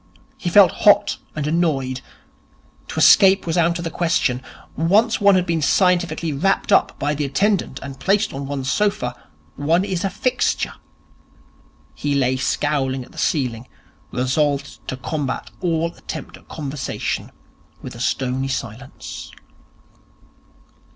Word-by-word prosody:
He - - -3
felt - - +7
hot - - +4 0.2
and 150 -2 -2
annoyed. 150 -5 0 0.9
To - - -8
escape 195 0 +6
was 165 -1 -1
out 170 -1 +2
of 170 - -5
the 165 - -3
question. 165 -8 0 0.3
Once 205 - +2
one 200 -1 +6
has 180 -1 +2
been 165 -2 0
scientifically 175 -1 +2
wrapped 195 +9 0
up 195 - +3
by 145 +1 -1
the 150 0 -2
attendant 160 0 0
and 135 -1 -8
placed 200 +8 +1
on 135 0 -5
one's 135 -2 -4
sofa, 200 -13 0 0.4
one 165 +6 +2
is 185 -2 -2
a 195 - +1
fixture. 245 +6 0 1.2
He 145 -1 -2
lay 130 -2 +2
scowling 135 -1 -1
at - - -19
the - - -10
ceiling, 125 -5 -1 0.4
resolved 140 +2 0
to 130 - -4
combat 135 0 -4
all 170 -1 0
attempt - - -8
at - - -18
conversation 145 -2 -4 0.5
with 130 - -7
a 120 - -11
stony 130 +1 -1
silence. 130 0 -6
150 Hz, 135 wpm, -21 LUFS, 135-175 Hz, 1.2 s, felt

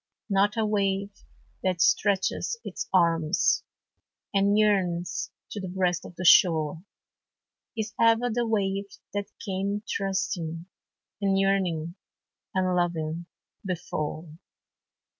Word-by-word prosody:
Not 200 +3 +3
a 220 - +2
wave 200 -1 0 0.5
that 185 -2 0
stretches 200 - +2
its - - -5
arms, 165 -4 +3 0.7
And 200 +1 +3
yearns 180 -6 +1 0.2
to 205 - -4
the 190 - -4
breast 180 -1 0
of - - -14
the 180 - -5
shore, 160 -2 +5 0.9
Is 220 -1 -3
ever 230 +1 +4
the 240 0 0
wave 200 -2 0 0.3
that 205 -1 -2 0.2
came 200 +2 -2
trusting, 175 -4 -2 0.6
And 195 -1 +2
yearning, 185 -4 +1 0.6
and 185 -1 +2
loving, 170 -1 -1 0.4
before. 165 -3 -4
190 Hz, 105 wpm, -27 LUFS, 170-200 Hz, 0.9 s, shore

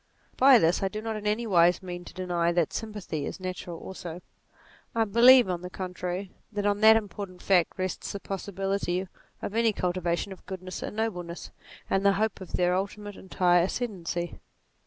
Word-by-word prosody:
By 265 -1 +7
this 170 -4 +2
I 195 - +1
do 215 +2 -5
not 220 0 -3
in 210 0 -4
any 215 +3 0
wise 175 -2 +4
mean 175 -1 -6
to - - -11
deny 175 -2 0
that 170 -3 +1
sympathy 210 -9 -4
is - - -6
natural 180 -2 -5
also; 175 -1 -8 0.7
I 225 - +3
believe 240 +3 +7
on 180 -2 -2
the 180 - -6
contrary 180 +1 -5 0.2
that 205 -1 -2
on 205 0 +1
that 220 0 +8
important 200 -4 -4
fact 180 -4 +2
rests 185 0 -3
the 200 - -5
possibility 195 -1 -2 0.4
of - - -3
any 230 0 +3
cultivation 180 0 -1
of 190 - -10
goodness 185 -1 -6
and - - -5
noble 220 -5 -1
ness, 170 0 -8 0.4
and 195 0 +1
the 200 0 +5
hope 215 +1 -1
of 185 - -10
their 180 0 +2
ultimate 205 +2 -4
entire 180 -2 +2
ascendancy. 175 -4 -3
190 Hz, 180 wpm, -28 LUFS, 180-210 Hz, 0.7 s, that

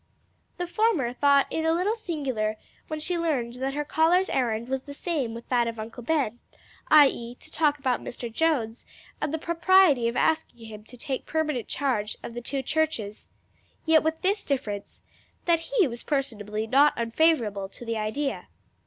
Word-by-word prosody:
The 355 - -2
former 350 - +1
thought 280 +1 +4
it 320 - -1
a 320 - +3
little 370 +6 +1
singular 270 - -2 0.3
when 310 -1 -4
she 345 +3 -2
learned 270 -8 -1
that 270 +1 -1
her 295 0 -2
caller's 345 +6 +3
errand 235 -3 0
was 265 0 -2
the 285 +1 -10
same 285 -9 -2
with 235 - -9
that 240 -2 +2
of 230 -1 -5
Uncle 225 +3 -7
Ben, 245 -4 0 0.5
i.e., 265 -5 +5
to 315 - -15
talk 300 -3 +2
about 260 -3 0
Mr. 235 -2 -7
Jones 250 -7 0 0.4
and 300 - -1
the 320 - -1
propriety 335 -5 +4
of 235 - -2
asking 310 -7 0
him 215 -1 -10
to 250 - -13
take 265 0 -4
permanent 305 -7 -1
charge 245 -7 -1
of 235 - -7
the 240 - -5
two 270 +3 -3
churches: 265 -9 -2 0.6
yet 320 -1 +5
with 320 0 -1
this 400 +3 +1
difference 210 -8 -4 0.4
that 340 -1 +3
he 465 -9 +3
was 235 -1 -7
personally 215 -7 -2
not 275 +6 +4
unfavorable 230 -5 +1
to 240 - -11
the 230 -1 -2
idea. 270 +7 -2
275 Hz, 175 wpm, -26 LUFS, 230-320 Hz, 0.6 s, i.e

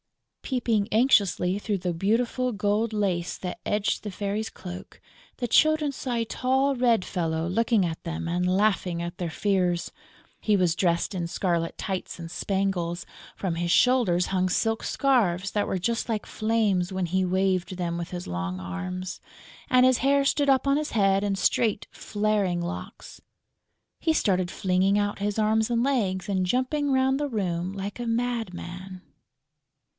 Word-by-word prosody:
Peeping 230 -5 0
anxiously 200 -6 +3
through 205 -1 -1
the 180 -1 -2
beautiful 235 +7 0
gold 210 +1 0
lace 190 -5 -1
that 180 -1 -6
edged 210 0 0
the 210 - -5
Fairy's 205 +3 -3
cloak, 180 -1 -9 0.4
the 245 - -2
Children 310 +3 +3
saw 255 -2 -3
a 230 -1 0
tall, 265 +4 +1
red 240 -6 +2
fellow 165 -3 -1
looking 225 +1 +2
at 165 -1 -4
them 165 0 -4
and 175 +1 0
laughing 190 -4 +1
at 175 +1 -5
their 175 -2 -3
fears. 180 -1 0 0.5
He 210 -2 +3
was 175 -3 +2
dressed 175 +2 0
in 170 -2 -2
scarlet 170 -1 -1
tights 190 -2 -4
and 165 -1 -7
spangles; 190 -2 -1 0.3
from 180 -4 -2
his 170 0 -1
shoulders 220 -9 +4
hung 185 -1 0
silk 225 +4 0
scarves 200 -9 +1
that 205 - 0
were - - -1
just 230 +6 -1
like 215 -2 -1
flames 215 -5 0
when 190 -1 -1
he 185 +2 0
waved 185 0 0
them 170 -2 -2
with 170 0 -4
his 180 -1 -6
long 90 +1 -3
arms; 180 - -5 0.5
and 255 0 +5
his 255 -1 +4
hair 275 +1 +3
stood 285 0 +2
up 270 0 +3
on 275 - +4
his 300 +1 -1
head 195 -2 +3
in 200 -1 0
straight, 205 +2 +1
flaring 205 -4 0
locks. 170 +1 -7 0.8
He 325 - +1
started 185 - +1
flinging 190 +2 +2
out 205 0 -1
his 205 +1 -1
arms 220 +1 +2
and 235 0 +1
legs 200 -9 0
and 190 -2 0
jumping 260 +7 0
round 265 +1 +2
the 290 -1 -1
room 180 -5 -2
like 200 +3 -6
a 240 - -3
madman. 190 -6 -3
195 Hz, 165 wpm, -26 LUFS, 180-230 Hz, 0.8 s, and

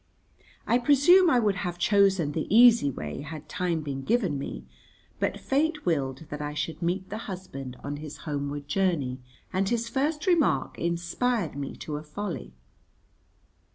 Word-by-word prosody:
I 240 - +3
presume 300 +8 +6
I 255 - +4
would 205 -4 +1
have 175 -1 -3
chosen 190 -4 +3
the 155 +1 -3
easy 230 -6 +7
way 75 - -5
had 155 +1 -8
time 170 +1 -1
been 140 -2 -4
given 190 - +1
me, 65 - -6 0.5
but - - -1
fate 300 +3 0
willed 140 -3 -1
that 150 0 -4
I 150 0 -4
should 155 +1 -3
meet 180 +2 -1
the 215 - -3
husband 135 -9 -7
on 145 +1 -4
his 150 0 -8
homeward 145 -1 -3
journey, 145 -7 0 0.3
and 190 +1 +1
his 235 -1 0
first 295 +4 -1
remark 320 - +2
inspired 170 - -1
me 140 -1 -5
to 150 -1 -5
a 150 - -7
folly. 180 - -5
170 Hz, 155 wpm, -27 LUFS, 145-225 Hz, 0.5 s, easy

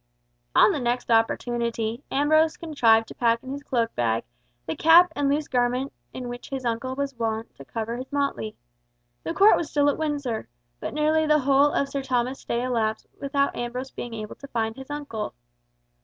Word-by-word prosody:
On - - +7
the 305 - -1
next 245 -1 -1
opportunity, 230 +1 0
Ambrose 310 +3 +3
contrived 230 -9 +3
to - - -8
pack 230 0 +1
in 260 - -7
his 280 +1 -5
cloak 235 -5 -1
bag, 115 -2 0 0.4
the 160 - -3
cap 335 +2 +6
and 285 -1 +1
loose 295 +1 0
garment 250 +1 0 0.2
in 250 - -6
which 245 0 -7
his 265 -2 -4
uncle 240 +3 -2
was 280 0 -2
wont 225 -2 -3
to 140 - -10
cover 225 - -4
his 260 +3 -8
motley. 280 -6 -1 0.7
The 330 - -4
Court 410 +2 +7
was 320 - -3
still 290 -1 +3
at - - -6
Windsor; 285 - -2 0.3
but - - -5
nearly 310 +1 +2
the 300 0 +5
whole 275 +2 +4
of 280 - 0
Sir 275 0 -3
Thomas's 255 0 -1
stay 235 +1 -2
elapsed 225 -3 -1 0.2
without 280 0 0
Ambrose 250 +2 -4
being 235 -1 -6
able 215 -1 -6
to 280 - -10
find 225 -3 -2
his 265 +1 -10
uncle. 285 -8 -5
255 Hz, 185 wpm, -25 LUFS, 230-285 Hz, 0.7 s, On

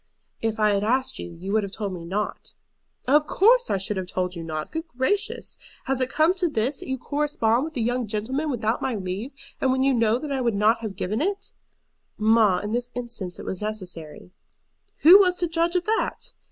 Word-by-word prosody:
"If 225 -1 -1
I 210 -1 +4
had 200 0 +1
asked 255 +4 0
you, - - -6
you 190 +4 -5
would 220 - +3
have 200 -2 -5
told 205 -2 -4
me 175 -2 -7
not." 205 +5 -4 0.5
"Of 295 +3 +4
course 480 +5 +4
I - - +2
should 195 +1 -2
have 185 -1 -3
told 180 0 -2
you 170 - -6
not. 155 -1 -5
Good 320 +1 -4
gracious! 290 - -2 0.2
has 265 -1 -1
it 255 - 0
come 315 +5 +3
to 360 -1 +2
this, 260 +1 -1
that - - -10
you 265 0 -2
correspond 285 -3 0
with 315 -3 -7
a - - 0
young 245 +1 0
gentleman 250 +9 -2
without 230 -3 -1
my 260 -3 -1
leave, 195 +6 -4 0.3
and 260 - +3
when 260 0 +1
you 270 0 +3
know 230 -1 +3
that 290 +3 -6
I 270 -1 -1
would 235 -4 +1
not 215 +3 +3
have 215 -4 -5
given 210 +7 -2
it?" 395 +4 -2 0.7
"Mamma, 215 -4 +4
in 210 - -3
this 245 +1 -1
instance 235 -7 -5
it - - -9
was 190 - -4
necessary." 180 -7 -6 0.7
"Who 360 +6 +10
was 365 -3 +4
to 350 -1 0
judge 335 +2 0
of 360 - +1
that?" 445 +3 -1
235 Hz, 220 wpm, -24 LUFS, 205-295 Hz, 0.7 s, Who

